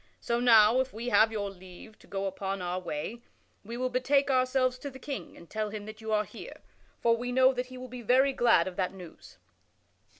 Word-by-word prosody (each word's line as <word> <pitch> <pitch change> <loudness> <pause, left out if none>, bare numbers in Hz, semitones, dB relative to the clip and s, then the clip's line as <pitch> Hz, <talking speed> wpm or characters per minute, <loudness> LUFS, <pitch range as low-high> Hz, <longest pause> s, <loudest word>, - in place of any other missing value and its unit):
So 235 0 -1
now, 230 -1 +6
if 260 0 -1
we 230 +3 -4
have 220 0 +5
your 200 -2 -3
leave 185 +3 -14
to - - -19
go 195 0 -3
upon 195 0 -3
our 180 0 -2
way, 180 +7 -5 0.4
we 230 +3 -7
will 255 0 -1
betake 275 +3 +2
ourselves 255 0 +1
to 285 - -6
the 265 - -11
King 265 - -7
and 170 - -14
tell 215 +2 -3
him 205 0 -7
that 215 +1 -10
you 220 0 -5
are 210 0 +2
here, - - -11 0.4
for 230 0 +3
we 245 +1 -4
know 260 +1 +5
that 250 0 -3
he 255 0 -10
will 255 0 -8
be 250 0 -8
very 260 +4 +3
glad 235 -9 +4
of 185 - -7
that 185 0 -1
news." 180 -3 -13
230 Hz, 225 wpm, -29 LUFS, 195-255 Hz, 0.4 s, now